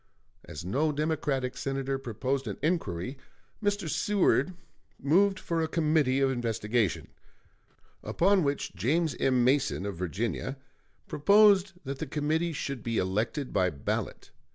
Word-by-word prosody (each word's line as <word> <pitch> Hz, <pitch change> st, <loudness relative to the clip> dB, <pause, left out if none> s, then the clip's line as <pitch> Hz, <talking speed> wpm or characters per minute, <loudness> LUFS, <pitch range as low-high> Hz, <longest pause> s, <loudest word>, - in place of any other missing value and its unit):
As 85 Hz, -1 st, -8 dB
no 145 Hz, -, +1 dB
Democratic 145 Hz, -4 st, -1 dB
Senator 135 Hz, 0 st, -2 dB
proposed 130 Hz, +2 st, -2 dB
an 100 Hz, -, -4 dB
inquiry, 135 Hz, -, -1 dB, 0.4 s
Mr. 205 Hz, -3 st, 0 dB
Seward 185 Hz, +3 st, +2 dB, 0.4 s
moved 190 Hz, +8 st, +3 dB
for 165 Hz, -1 st, -1 dB
a 160 Hz, -, 0 dB
committee 155 Hz, -5 st, +2 dB
of 135 Hz, -1 st, +3 dB
investigation; 115 Hz, -4 st, -1 dB, 0.9 s
upon 195 Hz, +1 st, +2 dB
which 140 Hz, -1 st, -2 dB
James 140 Hz, -, 0 dB
M. 130 Hz, -2 st, +3 dB
Mason, 130 Hz, -6 st, +1 dB
of 100 Hz, -4 st, -4 dB
Virginia, 110 Hz, -, -3 dB, 0.5 s
proposed 200 Hz, +4 st, +5 dB
that 135 Hz, -1 st, -5 dB
the 160 Hz, -, -4 dB
committee 155 Hz, +4 st, 0 dB
should 140 Hz, -4 st, -4 dB
be 115 Hz, 0 st, -2 dB
elected 110 Hz, +9 st, -1 dB
by 95 Hz, -2 st, +3 dB
ballot. 70 Hz, -5 st, -4 dB
135 Hz, 130 wpm, -29 LUFS, 120-160 Hz, 0.9 s, proposed